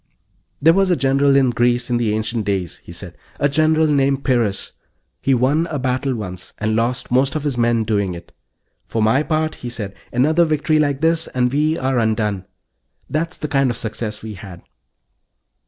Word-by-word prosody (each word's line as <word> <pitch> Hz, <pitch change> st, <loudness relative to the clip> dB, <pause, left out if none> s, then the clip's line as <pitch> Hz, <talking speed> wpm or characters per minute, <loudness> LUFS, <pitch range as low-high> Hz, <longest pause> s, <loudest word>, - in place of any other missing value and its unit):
"There 165 Hz, +3 st, +5 dB
was 195 Hz, +1 st, +2 dB
a 180 Hz, -, +4 dB
general 135 Hz, 0 st, +3 dB
in 135 Hz, -3 st, +4 dB
Greece 120 Hz, +1 st, +1 dB
in 120 Hz, -, +2 dB
the 110 Hz, -3 st, 0 dB
ancient 110 Hz, +1 st, -1 dB
days," 95 Hz, -4 st, -2 dB
he -, -, -14 dB
said. -, -, -9 dB, 0.2 s
"A 145 Hz, -, +3 dB
general 155 Hz, +2 st, +2 dB
named 140 Hz, -2 st, +1 dB
Pyrrhus. 115 Hz, -6 st, 0 dB, 0.5 s
He 135 Hz, -, +2 dB
won 140 Hz, +7 st, +2 dB
a 155 Hz, -, -3 dB
battle 130 Hz, 0 st, -1 dB
once, 90 Hz, -5 st, -7 dB
and 110 Hz, 0 st, -1 dB
lost 120 Hz, +2 st, -1 dB
most 130 Hz, +3 st, +2 dB
of 155 Hz, -, -2 dB
his 145 Hz, -3 st, -1 dB
men 120 Hz, -1 st, +2 dB
doing 100 Hz, -4 st, -1 dB
it. 85 Hz, 0 st, -12 dB, 0.5 s
'For 110 Hz, -, -1 dB
my 110 Hz, +6 st, +3 dB
part,' 155 Hz, 0 st, -1 dB
he 125 Hz, -, -5 dB
said, 105 Hz, -5 st, -5 dB, 0.2 s
'another 155 Hz, +8 st, +3 dB
victory 155 Hz, -1 st, +1 dB
like 145 Hz, -2 st, 0 dB
this 165 Hz, 0 st, +2 dB
and 125 Hz, -1 st, 0 dB
we 155 Hz, +2 st, +1 dB
are 130 Hz, -1 st, 0 dB
undone.' 105 Hz, -4 st, 0 dB, 0.7 s
That's 165 Hz, +3 st, -2 dB
the 150 Hz, -, -4 dB
kind 135 Hz, -2 st, +2 dB
of 120 Hz, -, -3 dB
success 110 Hz, -2 st, -5 dB
we 110 Hz, -1 st, -6 dB
had." 95 Hz, -3 st, -11 dB
125 Hz, 190 wpm, -20 LUFS, 110-150 Hz, 0.7 s, There